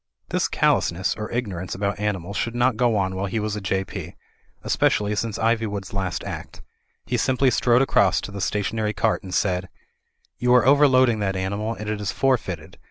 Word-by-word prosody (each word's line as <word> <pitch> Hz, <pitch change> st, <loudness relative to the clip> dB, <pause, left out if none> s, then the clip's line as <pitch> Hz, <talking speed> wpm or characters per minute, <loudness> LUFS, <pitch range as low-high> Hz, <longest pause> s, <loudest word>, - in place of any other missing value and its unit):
This -, -, +1 dB
callousness 90 Hz, +2 st, +1 dB
or 105 Hz, 0 st, -5 dB
ignorance 95 Hz, -7 st, -3 dB
about 100 Hz, +1 st, -2 dB
animals 100 Hz, -2 st, -2 dB
should 115 Hz, +2 st, -2 dB
not 120 Hz, 0 st, +2 dB
go 120 Hz, -1 st, +2 dB
on 95 Hz, -2 st, 0 dB
while 95 Hz, +1 st, -2 dB
he 110 Hz, +4 st, -2 dB
was 105 Hz, -1 st, -2 dB
a 105 Hz, -, -4 dB
J.P.; 95 Hz, 0 st, -3 dB, 0.5 s
especially 105 Hz, 0 st, +1 dB
since 105 Hz, +1 st, -2 dB
Iv)rwood's 110 Hz, -4 st, -1 dB
last 95 Hz, -3 st, -2 dB
Act. -, -, -7 dB, 0.4 s
He 125 Hz, -, -1 dB
simply 130 Hz, +2 st, +2 dB
strode 120 Hz, +1 st, +3 dB
across 100 Hz, -8 st, +3 dB
to -, -, -7 dB
the 100 Hz, -1 st, -6 dB
stationary 105 Hz, +2 st, -1 dB
cart 110 Hz, +1 st, +1 dB
and 95 Hz, -3 st, -9 dB
said: 90 Hz, 0 st, 0 dB, 0.7 s
"You 125 Hz, 0 st, +4 dB
are 125 Hz, -, +5 dB
overloading 130 Hz, -4 st, +5 dB
that 95 Hz, -2 st, -1 dB
animal, 100 Hz, +4 st, -2 dB
and 105 Hz, -, -7 dB
it 105 Hz, -1 st, -2 dB
is 100 Hz, -, -1 dB
forfeited. 95 Hz, -, -1 dB
105 Hz, 180 wpm, -23 LUFS, 95-115 Hz, 0.7 s, are